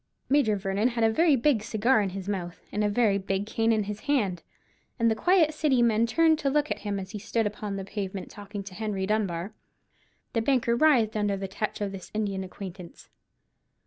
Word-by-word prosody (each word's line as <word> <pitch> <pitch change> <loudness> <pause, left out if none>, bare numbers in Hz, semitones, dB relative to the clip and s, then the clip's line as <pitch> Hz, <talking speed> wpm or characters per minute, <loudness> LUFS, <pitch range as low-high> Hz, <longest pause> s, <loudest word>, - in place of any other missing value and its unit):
Major 265 -7 +3
Vernon 195 +3 0
had 235 -2 -1
a 225 - +4
very 320 +5 +4
big 260 -2 +2
cigar 220 +2 +2
in 200 - -1
his 190 0 -7
mouth, 180 -4 -4
and 210 - -1
a 210 - +2
very 205 -2 +2
big 195 +1 -2
cane 225 +1 +1
in 215 -2 +2
his 210 +1 -5
hand, 210 - 0 0.6
and 230 -1 +3
the - - +1
quiet 345 - +3
City 285 -5 +2
men 230 0 +3
turned 320 +5 +3
to 280 - 0
look 295 +2 +1
at - - -1
him 205 -2 -3
as 190 0 -7
he 210 - -5
stood 225 +2 -1
upon 210 -1 -4
the 195 -1 -5
pavement 195 -1 -5
talking 205 -1 -7
to 195 -1 -10
Henry 205 -2 -2
Dunbar. 195 -2 -1 0.8
The 230 - +1
banker 235 -1 +2
writhed 235 -6 +4
under 205 -2 0
the 195 0 -4
touch 210 +2 -4
of 200 -1 -2
his 190 -2 -9
Indian 200 -3 -1
acquaintance. 185 -2 -10
210 Hz, 210 wpm, -27 LUFS, 195-235 Hz, 0.8 s, a